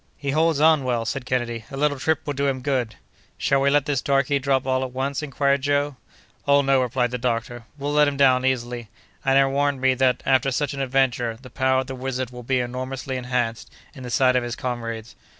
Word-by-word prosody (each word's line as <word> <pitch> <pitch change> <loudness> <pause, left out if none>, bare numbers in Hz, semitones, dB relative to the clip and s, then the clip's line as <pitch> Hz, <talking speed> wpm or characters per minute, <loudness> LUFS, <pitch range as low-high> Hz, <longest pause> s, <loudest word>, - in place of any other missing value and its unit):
"He 140 -1 -3
holds 160 0 +2
on 155 -2 +5
well," 120 -3 -1
said 125 +2 -4
Kennedy; 120 -3 -2
"a 135 - -7
little 145 -1 +1
trip 160 +2 +1
will 145 - -2
do 140 0 0
him 130 -1 -1
good." 125 -5 -1 0.4
"Shall 135 0 +1
we 140 - +3
let 145 0 +3
this 145 -4 0
darky 140 0 +1
drop 135 -1 +1
all 130 0 +1
at 130 - -3
once?" 135 +3 -2
inquired 140 -1 0
Joe. 145 0 0 0.5
"Oh 140 0 +5
no," 135 -1 +3
replied 125 -1 0
the 125 - -3
doctor, 120 -1 -2
"we'll 145 +1 -3
let 150 0 +5
him 140 -1 -2
down 130 -2 +4
easily; 120 -3 -2 0.3
and 135 0 +3
I 135 - +6
warrant 140 0 0
me 130 0 +3
that, 130 0 +1
after 135 0 +3
such 145 +2 -1
an 140 - -4
adventure, 125 -3 0
the 130 -1 -13
power 130 0 +2
of - - -6
the 135 - -6
wizard 130 -1 -4
will 125 0 -9
be 130 +2 0
enormously 130 +2 -4
enhanced 125 -2 -2 0.2
in 135 - -11
the 125 - -6
sight 125 +1 +3
of 125 - +3
his 120 0 -4
comrades." 115 -2 -5
130 Hz, 225 wpm, -23 LUFS, 125-140 Hz, 0.5 s, I